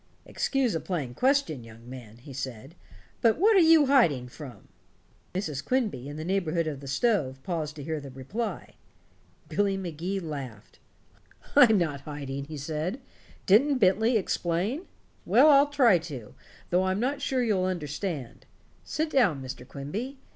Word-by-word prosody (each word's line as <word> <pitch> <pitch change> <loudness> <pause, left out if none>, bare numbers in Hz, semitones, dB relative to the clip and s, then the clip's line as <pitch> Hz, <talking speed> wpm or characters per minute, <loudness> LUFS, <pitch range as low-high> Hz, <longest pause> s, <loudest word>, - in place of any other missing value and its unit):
"Excuse 270 -4 0
a 165 - -1
plain 150 -10 -4
question, 255 - +1
young 115 +1 -14
man," 120 -4 -10
he 135 +3 -12
said, 130 +1 -6 0.5
"but 230 -2 +4
what 420 +6 +4
are - - +7
you 325 -3 +6
hiding 170 - +3
from?" 125 -5 -11 0.7
Mrs. 155 -7 -3
Quimby, 215 - -1
in 145 - -7
the 155 - -5
neighborhood 175 -3 0
of 150 -3 -4
the 140 - -10
stove, 140 - +1
paused 160 -5 -3
to 145 - -8
hear 160 +1 -3
the 140 - -9
reply. 165 - -5 0.7
Billy 200 -1 0
Magee 180 +1 -3
laughed. 140 - -8 0.8
"I'm 245 -7 +7
not 155 -6 -1
hiding," 140 -2 -6
he 155 +1 -8
said. 155 - -3 0.5
"Didn't 265 +8 +5
Bentley 220 +3 +3
explain? 195 - -1 0.4
Well, 305 - +6
I'll 285 0 +6
try 250 -11 +4
to, 140 -10 -8 0.4
though 180 +2 +3
I'm 190 +1 0
not 270 +5 -1
sure 260 -2 0
you'll 200 -5 +1
understand. 155 - -4 0.4
Sit 310 0 -2
down, 205 - +3
Mr. 130 -1 -8
Quimby. 200 - -5
170 Hz, 155 wpm, -27 LUFS, 140-230 Hz, 0.8 s, are